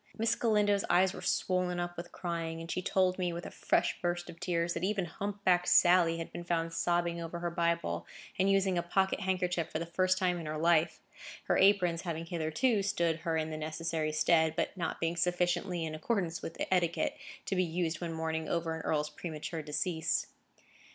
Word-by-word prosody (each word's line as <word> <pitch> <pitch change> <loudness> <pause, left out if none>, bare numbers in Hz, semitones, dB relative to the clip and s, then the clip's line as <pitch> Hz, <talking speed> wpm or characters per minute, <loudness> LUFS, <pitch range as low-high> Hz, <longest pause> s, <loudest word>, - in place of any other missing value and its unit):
Miss 225 +1 +2
Galindo's 210 -4 +2
eyes 185 +1 +4
were - - -8
swollen 180 -1 0
up 175 0 -3
with 175 0 -7
crying, 165 -2 -4
and 165 0 -6
she 185 - -1
told 185 0 +1
me, 180 -1 0
with 170 +1 -6
a - - -7
fresh - - 0
burst 175 0 -2
of 165 - -16
tears, 170 -1 0
that 170 - -4
even 195 -1 0
hump 200 +4 -5
backed 180 -1 +3
Sally 175 -2 +5
had 165 - -6
been 175 - -6
found 165 -1 -1
sobbing 170 0 0
over 165 +1 -5
her 170 0 -3
Bible, 170 - -1 0.3
and 190 +1 +3
using 195 -2 +3
a - - +1
pocket 190 +3 +1
handkerchief 180 -4 -1
for - - -1
the 165 - -3
first 185 +2 +1
time 180 -2 +1
in 165 - -6
her 155 0 -3
life; 165 +1 +2 0.4
her - - +1
aprons 185 -4 +4
having 165 -2 -4
hitherto 175 +8 +1
stood 170 -5 +1
her 165 -1 -1
in 160 0 -2
the 155 - -4
necessary 155 0 -2
stead, 160 +1 +3
but - - -1
not 170 -3 -3
being 165 +1 0
sufficiently 175 0 0
in 155 - -4
accordance 170 0 -1
with - - -7
etiquette 175 -2 +1 0.3
to 195 - -1
be 185 - +3
used 165 -1 -2
when 170 -1 -3
mourning 160 -1 -2
over 165 -1 -1
an 160 - -5
earl's 150 -1 -1
premature 160 +1 -5
decease. 155 +2 -1
170 Hz, 200 wpm, -32 LUFS, 165-185 Hz, 0.4 s, Sally